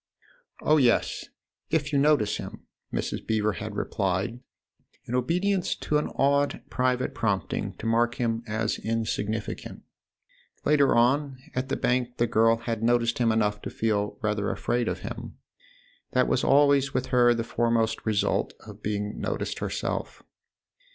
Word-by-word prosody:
" - - -26
Oh, 155 - +7
yes, 125 -5 +2 0.4
if 150 -2 0
you 140 - +4
notice 140 -8 +3
him! - - -8 0.2
" - - -54
Mrs. - - -3
Beever 110 -1 +1
had 105 +1 -6
replied 100 +3 -1 0.7
in 120 - -6
obedience 180 +9 +1
to 150 - 0
an - - -2
odd 140 +1 +2
private 125 +1 0
prompting 100 -6 -1
to - - -9
mark 120 +1 +2
him 115 -2 -1
as 110 0 -1
insignificant. 110 -1 -3 0.8
Later 145 -3 +4
on, 135 +3 +2 0.2
at 130 +1 -2
the - - 0
Bank, 125 0 0
the 120 - +3
girl 115 0 +3 0.2
noticed 115 0 +2
him 115 -2 +3
enough 105 -2 +1
to - - -5
feel 105 -2 -1
rather 105 -1 0
afraid 120 -1 -1
of - - -2
him: - - -7 0.8
that 125 0 +3
was 125 - +1
always 140 -1 +4
with 130 0 +1
her 120 -1 +5
the 115 - -1
foremost 115 -1 0
result 110 -2 0
of - - -11
being 105 0 -3
noticed - - -3
herself. - - -3
120 Hz, 150 wpm, -27 LUFS, 110-135 Hz, 0.8 s, Oh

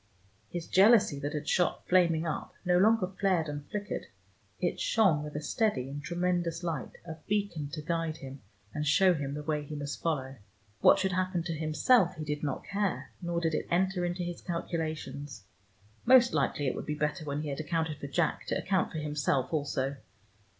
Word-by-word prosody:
His 175 -2 -4
jealousy 195 -7 +5
that 145 +1 -3
had 150 0 -4
shot 180 - +1
flaming 170 -3 +3
up, 160 - -4
no 180 0 +4
longer 220 0 +4
flared 185 -3 0
and 145 -1 -6
flickered: 210 0 -4 0.5
it - - -1
shone 205 - +3
with 150 -1 -7
a 150 - -2
steady 205 - 0
and 145 +1 -5
tremendous 175 +1 -1
light, 165 -6 -4
a 160 -2 -7
beacon 200 -8 -1
to 155 +1 -6
guide 165 -1 -1
him, 135 0 -9 0.3
and 150 0 -2
show 185 +5 +5
him 145 -3 -3
the 150 - -5
way 150 -1 -1
he 150 +1 -7
must 145 -1 -5
follow. 135 -5 -2 0.4
What - - +7
should 190 0 0
happen 185 -1 0
to 170 -1 -3
himself 165 +6 +3
he 155 -1 -6
did 150 0 -3
not 140 -3 -2
care, 190 -10 -2
nor 170 -1 -1
did 165 -1 0
it - - -1
enter 185 +1 +1
into 175 +1 -2
his 175 0 -5
calculations: 155 - -4 0.6
most 245 -1 +6
likely 145 - 0
it 130 - +1
would - - -6
be 150 - -1
better 150 +3 -1
when 145 0 -3
he 150 - -3
had 140 - -4
accounted 155 -1 -2
for 140 - -5
Jack 160 +2 0
to - - 0
account 190 -1 0
for 160 - -5
himself 150 -2 0
also. 140 -2 -1
160 Hz, 190 wpm, -30 LUFS, 150-180 Hz, 0.6 s, What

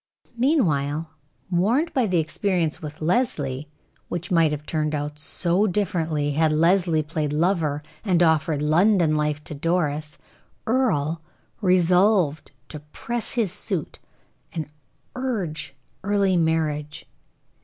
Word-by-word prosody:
Meanwhile, 165 - +1 0.4
warned 230 - +1
by 255 -4 +2
the 185 -2 +1
experience 165 +1 -1
with 150 0 -7
Leslie, 150 - 0 0.4
which 175 +1 -4
might 165 -3 +4
have 150 0 -4
turned 155 -1 -1
out 150 0 -4
so 175 +6 +1
differently, 165 -7 -1
had 155 +2 +2
Leslie 165 0 +3
played 150 -1 -2
lover, 155 -2 0 0.2
and 180 -5 +3
offered 155 -2 +2
London 170 +1 +3
life 150 0 -1
to - - -7
Doris, 150 -1 -1 0.5
Earle 170 - +1 0.4
resolved 180 -3 +3 0.2
to 150 - -7
press 225 +10 -4
his 225 -7 0
suit, 185 -7 -4 0.5
and 155 -2 -5 0.4
urge 175 - -3 0.3
early 200 -1 +2
marriage. 155 -2 -1
160 Hz, 115 wpm, -24 LUFS, 150-190 Hz, 0.5 s, might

